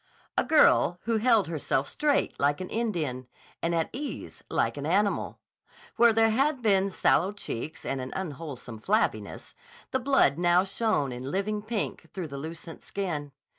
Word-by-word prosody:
A - - +3
girl 295 - +4
who 230 -1 +1
held 225 -3 +4
herself 145 -4 -1
straight 295 -1 0
like 145 +1 +2
an 185 - -5
Indian 160 - -2 0.3
and 170 0 0
at 165 -1 0
ease 285 +3 -6
like - - 0
an 145 0 -4
animal. 200 +4 +1 0.6
Where 235 0 +6
there 225 0 +4
had 270 +2 +1
been 195 -2 +3
sallow 190 0 +2
cheeks 155 - -5
and 135 -1 -2
an 130 - -6
unwholesome 145 -9 -6
flabbiness, 215 - -1 0.4
the 260 - +1
blood 260 - +3
now 175 +1 +4
shone 195 - 0
in 125 +2 -5
living 205 +5 -1
pink 215 0 -3
through 180 -5 -4
the 140 0 -6
lucent 165 +2 -8
skin. 160 -8 -4
185 Hz, 160 wpm, -28 LUFS, 145-220 Hz, 0.6 s, Where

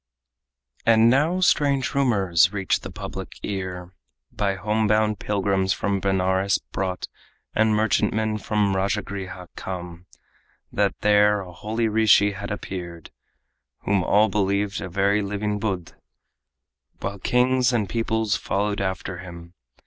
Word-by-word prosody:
And 115 0 +5
now 160 +8 +2
strange 140 -6 +2
rumors 100 - +3
reach 95 -2 0
the - - -8
public - - -7
ear, 95 -2 -5 0.4
By 100 -1 -1
home 105 +3 0
bound 105 -1 +2
pilgrims 95 -2 0
from 100 -1 -1
Benares 95 0 +1
brought 95 -1 -4 0.5
And 110 0 +3
merchantmen 110 0 +1
from 105 -1 0
Rajagriha 95 -2 -3
come, 90 -1 -7 0.6
That - - 0
there 105 0 +4
a 90 -2 -10
holy 110 +5 -2
rishi 105 -2 +4
had 100 +1 -6
appeared 90 -5 -6 0.7
Whom 100 -2 +1
all 105 +4 +4
believed 100 0 0
a 95 - -5
very 100 +3 +2
living 105 +1 -2
Buddh, 95 -6 -3 1.1
While 100 0 -4
kings 125 +3 +2
and 110 -5 0
peoples 110 -1 0
followed 100 +1 -1
after 95 -2 -3
him. 85 -2 -10
100 Hz, 125 wpm, -24 LUFS, 95-110 Hz, 1.1 s, And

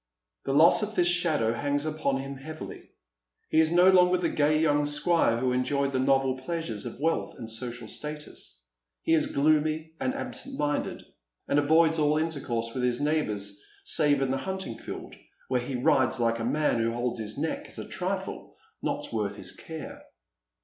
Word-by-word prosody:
The 135 - 0
loss 160 +8 +6
of 215 0 -3
this 175 - +3
shadow 160 -10 +2
hangs 145 +4 -1
upon 155 -3 0
him 135 0 -6
heavily. 155 +3 -9 0.6
He 160 - +3
is 160 0 +4
no 180 +2 +6
longer 180 -1 +5
the 175 -2 0
gay 155 +1 +2
young 145 -2 +2
squire 150 -4 +2
who 125 +1 0
enjoyed 135 +2 0
the 130 - +1
novel 135 0 +2
pleasures 130 -7 -4
of - - -9
wealth 165 +3 0
and 115 -4 -7
social 120 +1 -6
status. 150 - -7 0.4
He 165 - +2
is 160 - +3
gloomy 155 +2 +1
and 260 - -1
absent 270 +1 -5
minded, 145 0 -1 0.4
and 145 - +3
avoids 160 +2 +4
all 150 0 +3
intercourse 130 -8 -2
with 130 - -2
his 125 -1 +1
neighbours, 105 -10 -1 0.2
save 145 -3 +3
in 130 - 0
the 135 - 0
hunting 190 -6 -4
field, - - -7 0.4
where 125 -1 +1
he 125 +2 -4
rides 130 0 +2
like 115 -1 +1
a - - -2
man 150 -1 +1
who 115 0 +1
holdi 120 -1 -2
his 105 0 -5
neck - - -2
as - - -12
a - - -5
triiienot - - -5
worth 105 -2 -1
his - - -6
care. 160 -2 -8
145 Hz, 175 wpm, -28 LUFS, 125-160 Hz, 0.6 s, loss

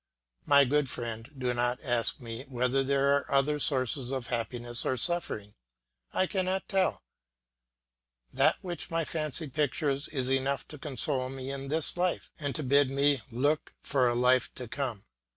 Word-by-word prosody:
My 140 -1 +7
good 145 +1 +1
friend, 115 -1 -5
do 125 -1 0
not 120 +1 0
ask 120 -4 +2
me 115 0 -7
whether 125 +1 +1
there 140 +1 +3
are 140 - -2
other 140 +2 +2
sources 130 -2 +1
of 130 -2 -3
happiness 120 +1 -2
or 130 - 0
suffering; 120 - +2 0.6
I 185 - +2
cannot 190 0 -1
tell; 190 -2 +1 1.3
that - - +4
which 175 -2 -5
my 165 -1 0
fancy 155 0 -2
pictures 140 0 0
is 130 -4 -1
enough 135 +1 0
to 150 - -8
console 135 -2 -1
me 135 0 -6
in 140 0 -5
this 155 +2 0
life 180 0 -1
and 145 -3 -3
to 155 - -1
bid 140 +1 +4
me 140 -1 +2
look 145 +6 0
for 130 -3 +2
a 120 - 0
life 125 0 +3
to 125 - -7
come. 120 -5 -4
135 Hz, 165 wpm, -29 LUFS, 125-150 Hz, 1.3 s, My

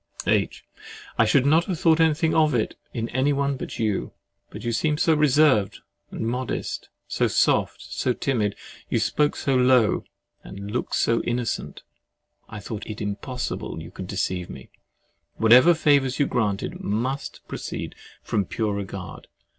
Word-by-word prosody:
H. - - 0 0.5
I - - +6
should 135 -2 +3
not 160 +4 +4
have 180 -5 -3
thought 165 -1 +4
anything 160 0 +3
of 155 -4 +3
it 110 - -1 0.2
in 115 -1 -3
anyone 140 +2 +1
but 130 - -6
you. 110 -4 -1 0.4
But 105 - -9
you 120 - -1
seemed 150 +6 0
so 165 - +4
reserved 145 -8 +3 0.3
and - - -7
modest, 125 +3 -3 0.2
so - - +1
soft, - - +1
so 130 - -1
timid, 115 -5 -1 0.3
you - - +1
spoke 150 -1 +1
so 135 - -1
low, 125 -3 +4 0.4
you - - -10
looked 105 +5 -2
so 115 0 +2
innocent—I 120 -3 -6
thought 105 +1 -6
it 110 -1 -6
impossible 110 +5 -4
you - - -9
could - - -7
deceive 90 -1 -2
me. - - -11 0.6
Whatever 125 +10 +6
favors 140 -5 +3
you 145 - +3
granted 105 -7 -1
must 125 +7 -3
proceed - - -5 0.3
from 105 -4 0
pure 110 0 -2
regard. 95 -3 -6
125 Hz, 145 wpm, -24 LUFS, 110-145 Hz, 0.6 s, I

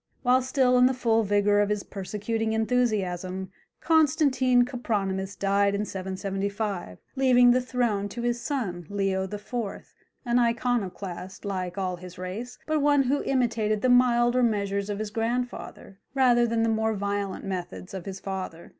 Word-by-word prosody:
While 255 +1 +4
still 255 -1 +2
in 250 - +7
the 260 - 0
full 225 -3 +2
vigour 205 0 +2
of 205 0 +2
his 210 -1 -1
persecuting 215 +3 -3
enthusiasm, 195 -6 -1 0.3
Constantine 275 -6 +3
Copronymus 200 -6 -2
died 200 0 +2
in 205 +1 -1
775, 195 - -4 0.2
leaving 250 -2 +5
the 255 +1 +3
throne 235 -5 -1
to 235 +4 -6
his 240 0 -1
son, 190 - -3
Leo 195 -1 0
IV., 205 +4 -9 0.7
an 240 0 +2
Iconoclast, 205 -6 -2
like 185 -2 -3
all 185 -2 -2
his 180 0 -11
race, 190 +7 -6
but 310 -1 0
one 285 -1 +4
who 275 +3 +1
imitated 225 -5 0
the 255 - +3
milder 245 0 +4
measures 200 -3 0
of 205 - -2
his 215 0 -4
grandfather 230 -3 -4 0.2
rather 245 -3 +4
than 230 0 +1
the - - +2
more 220 0 +1
violent 200 -1 -3
methods 185 -1 -5
of 190 -3 -6
his 195 0 -5
father. 185 -4 -6
215 Hz, 155 wpm, -26 LUFS, 195-245 Hz, 0.7 s, in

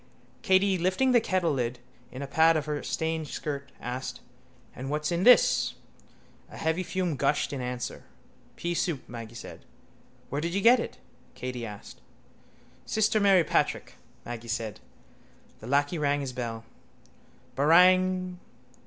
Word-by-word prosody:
Katey, 190 -2 +3
lifting 185 +10 +2
the 240 -2 +5
kettlelid 145 - 0 0.4
in 130 +2 -6
a - - -5
pad 160 +3 +4
of 150 - -2
her 150 -1 -3
stained 160 -1 -2
skirt, 140 -1 -5
asked: 125 +1 -5 0.6
—And 130 +2 -6
what's 150 +2 -1
in 170 0 0
this? 250 0 +5 0.7
A - - -11
heavy 160 +3 0
fume 185 -3 -2
gushed 140 +2 0
in 135 - -3
answer. 125 -1 -5 0.5
—Peasoup, 170 -4 -2
Maggy 115 -1 -8
said. - - -10 0.7
—Where 140 +2 -1
did 170 +3 -2
you 200 - +1
get 240 +4 +6
it? - - -5 0.4
Katey 125 -1 -5
asked. 105 -1 -11 0.9
—Sister 215 0 +2
Mary 195 -4 +5
Patrick, - - 0 0.3
Maggy 120 -1 -7
said. 115 - -3 0.8
The 110 - -10
lacquey 145 +5 +1
rang 145 -1 +1
his 135 -2 -4
bell. 115 -2 -5 0.9
—Barang! 185 +4 +4
150 Hz, 135 wpm, -28 LUFS, 125-185 Hz, 0.9 s, get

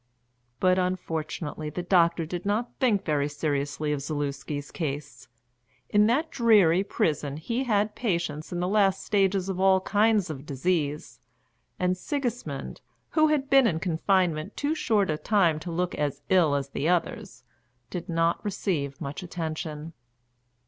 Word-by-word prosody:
But 185 0 +3
unfortunately 160 -4 -3
the 175 +4 -5
doctor 170 -2 +3
did 175 +2 -5
not 215 +4 -1
think 210 -6 +2
very 150 -2 +1
seriously 145 0 -2
of 145 - -3
Zaluski's 145 -1 -4
case. 145 -3 -5 0.6
In 210 0 +4
that 295 +8 +1
dreary 205 -8 +4
prison 150 -7 -1
he 235 +11 -2
had 210 -2 +1
patients 170 -9 -2
in 175 0 -2
the 180 - 0
last 195 -1 +2
stages 195 -2 +1
of 190 -2 -3
all 190 0 +5
kinds 210 -2 +2
of 135 -3 -7
disease, 150 +1 -2 0.6
and 180 0 +1
Sigismund, 235 - -4 0.3
who 310 -1 +4
had 295 -3 +1
been 270 -3 +5
in 160 -7 0
confinement 180 0 0
too 290 +2 0
short 210 - +1
a 150 - -2
time 180 -8 +2
to 170 +2 -6
look 180 +1 -1
as 145 -2 -2
ill 170 -6 +4
as 140 -1 -2
the 145 +3 -1
others, 180 - -2 0.5
did 175 -1 -5
not 165 0 +1
receive 165 -9 -2
much 140 +5 -5
attention. 160 -2 -5
175 Hz, 150 wpm, -27 LUFS, 150-200 Hz, 0.6 s, all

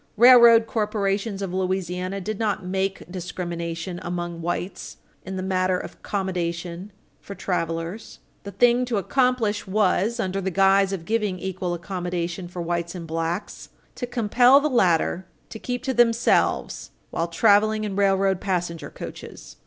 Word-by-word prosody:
Railroad 235 -1 +8
corporations 205 -2 -1
of 185 -2 -4
Louisiana 185 0 -2
did 205 +2 -5
not 205 -4 -1
make 190 +1 -2
discrimination 175 -1 -5
among 175 -1 -4
whites 175 +2 -4 0.3
in 190 - -4
the 185 - -3
matter 185 -1 +1
of - - -7
accommodation 180 -1 -4 0.3
for 200 - -9
travelers. 170 +2 -3 0.2
The 200 - -8
thing 240 +5 +3
to 240 -3 -1
accomplish 235 0 0
was, 210 +3 +1
under 195 -2 -1
the 190 - -1
guise 195 +1 +3
of 180 -4 -4
giving 210 -3 -1
equal 185 -1 -3
accommodation 175 0 -4
for 175 0 -6
whites 170 +1 -3
and 170 -2 -6
blacks, 165 +4 -4 0.2
to 245 - -5
compel 245 +3 +4
the 300 +1 -1
latter 180 -4 +2 0.2
to 220 - -8
keep 245 +1 -4
to 265 - -1
themselves 235 -1 +2 0.2
while 165 - -1
traveling 215 +4 +3
in 205 -2 -3
railroad 195 -1 +2
passenger 175 -4 -2
coaches. - - -10
190 Hz, 145 wpm, -24 LUFS, 175-215 Hz, 0.3 s, Railroad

